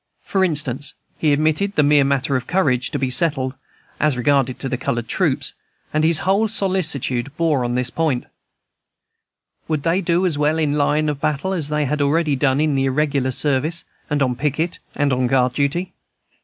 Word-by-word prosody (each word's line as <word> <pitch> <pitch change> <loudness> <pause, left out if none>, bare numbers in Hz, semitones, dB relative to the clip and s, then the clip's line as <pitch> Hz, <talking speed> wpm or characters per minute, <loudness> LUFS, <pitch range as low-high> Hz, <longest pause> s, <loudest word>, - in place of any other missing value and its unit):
For 190 -1 0
instance, 150 -5 -1 0.2
he 155 - +2
admitted 155 +7 +1
the 150 - +4
mere 145 0 +4
matter 140 0 0
of 130 - -2
courage 130 -9 +1
to - - -3
be 130 -2 -1
settled, 135 -2 +3 0.4
as 150 -4 +1
regarded 130 0 +1
the 130 -2 -2
colored 120 -2 -3
troops, - - -1 0.4
and 155 0 +1
his 160 0 +4
whole 200 +4 +2
solicitude 160 - -1
bore 155 -6 +1
on 120 0 -2
this 125 -1 0
point, 155 -7 -1 1.4
Would 155 -3 -2
they 170 +3 +1
do 175 +1 +1
as 160 -5 0
well 150 +2 +2
in 150 -3 +1
line 150 +1 +1
of 145 -2 -3
battle 155 +6 -1
as 160 -6 -2
they 150 -1 0
had 150 +2 -1
already 150 +1 +1
done 135 0 +1
in 155 -1 +1
more 135 0 +1
irregular 140 -1 0
service, 145 +5 0 0.2
and 145 -2 +1
on 125 -2 0
picket 150 +5 -2 0.2
and 130 -4 +1
guard 125 -1 +2
duty? 150 +7 -1
145 Hz, 180 wpm, -20 LUFS, 130-160 Hz, 1.4 s, the